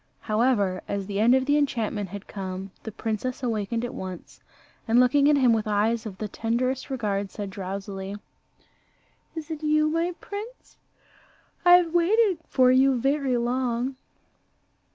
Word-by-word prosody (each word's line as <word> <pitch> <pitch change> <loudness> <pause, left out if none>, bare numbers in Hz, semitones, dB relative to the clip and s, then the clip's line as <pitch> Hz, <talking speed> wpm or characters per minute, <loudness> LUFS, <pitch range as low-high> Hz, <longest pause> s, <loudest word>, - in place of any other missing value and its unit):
However, 215 -4 +1
as 200 -1 -3
the 200 0 -3
end 235 +4 +5
of 260 0 +1
the 290 +2 +3
enchantment 220 -8 -1
had 200 +1 -8
come, 190 -1 -6
the 220 - -7
princess 225 +5 -4
awakened 230 0 -1
at 245 - -6
once, 185 -2 -8 0.5
and 230 +2 +4
looking 280 +3 +4
at 295 - +4
him 255 -4 +4
with 220 -1 -1
eyes 220 +2 +1
of 190 -3 -9
the 215 - -4
tenderest 240 +5 -2
regard, 205 -6 -2
said 200 0 -6
drowsily, 195 +1 -5 1.2
"Is 320 0 -6
it 315 -1 -5
you, 305 0 +2
my 335 +2 -1
prince? 430 +5 -9 0.9
I 355 - +7
have 350 -2 +5
waited 375 +2 +3
for 255 -1 +4
you 260 0 +4
very 270 0 +1
long." 245 +1 -1
240 Hz, 155 wpm, -25 LUFS, 205-280 Hz, 1.2 s, I